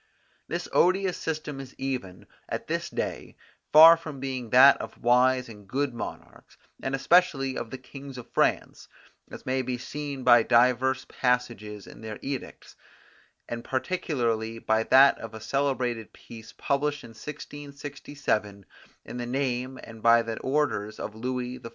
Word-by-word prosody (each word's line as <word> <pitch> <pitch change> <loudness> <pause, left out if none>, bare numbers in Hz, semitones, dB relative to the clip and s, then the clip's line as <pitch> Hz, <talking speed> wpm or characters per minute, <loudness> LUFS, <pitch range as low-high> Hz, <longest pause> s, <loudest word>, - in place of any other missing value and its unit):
This - - -3
odious 185 0 +3
system 155 -3 -4
is 135 -1 -10
even, 125 -9 -4 0.2
at - - -4
this - - -2
day, - - -4 0.4
far 160 +2 +10
from 155 -4 -8
being 130 -3 -4
that 130 +4 +8
of - - -8
wise 125 +1 +3
and 105 -3 -13
good 135 +4 -1
monarchs, 115 - -9 0.2
and 135 0 -1
especially 135 -3 +3
of 115 - -4
the 130 - -6
kings 135 +1 -11
of 125 - -9
France, - - 0 0.4
as - - -10
may 130 +1 0
be 125 -1 -3
seen 140 +1 -6
by 120 -1 +7
divers 125 +3 +3
passages 120 -5 -2
in - - -13
their 110 -1 -6
edicts, 135 -1 -6 0.7
and 120 0 -5
particularly 120 -7 -1
by 110 -1 +1
that 135 +4 +6
of 115 -1 -8
a - - -7
celebrated 125 -3 -1
piece 115 -1 -12
published 145 +1 -1
in - - -11
1667 140 -6 -5 0.4
in - - -7
the 120 -1 -4
name 130 0 -2
and 115 -1 -11
by 115 +1 +5
the 115 -1 -5
orders 130 -7 -1
of - - -5
Louis 125 +2 -4
XIV. 115 - -9
130 Hz, 150 wpm, -27 LUFS, 115-140 Hz, 0.7 s, far